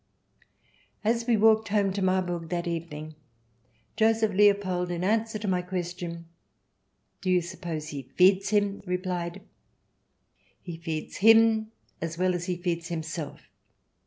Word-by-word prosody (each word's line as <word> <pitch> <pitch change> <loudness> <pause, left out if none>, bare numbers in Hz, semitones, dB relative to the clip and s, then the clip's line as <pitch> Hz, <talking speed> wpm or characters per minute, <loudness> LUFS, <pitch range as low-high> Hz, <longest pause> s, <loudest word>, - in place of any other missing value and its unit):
As 230 +2 0
we 235 -2 +4
walked 220 +1 +4
home 200 -2 +1
to 200 - -3
Marburg 180 -3 0
that 175 0 -2
evening, 155 -2 -5 0.8
Joseph 220 -1 +2
Leopold, 195 -3 +3
in 175 0 -3
answer 220 +2 +1
to 210 0 -5
my 180 -2 +1
question, 175 -2 -5 0.5
" - - -47
Do 185 - -2
you 180 -1 +4
suppose 170 -3 -6
he 140 -2 -5
feeds 185 +9 +3
him 205 -1 +1
?" - - -25
replied: 180 0 -3 0.6
" - - -41
He 170 -3 -7
feeds 160 -2 -5
him 225 +1 +5 0.3
as 165 0 -4
well 185 0 +2
as 175 -1 -3
he 180 -2 -2
feeds 170 -2 -2
himself. 165 -2 -5
180 Hz, 145 wpm, -27 LUFS, 170-205 Hz, 0.8 s, him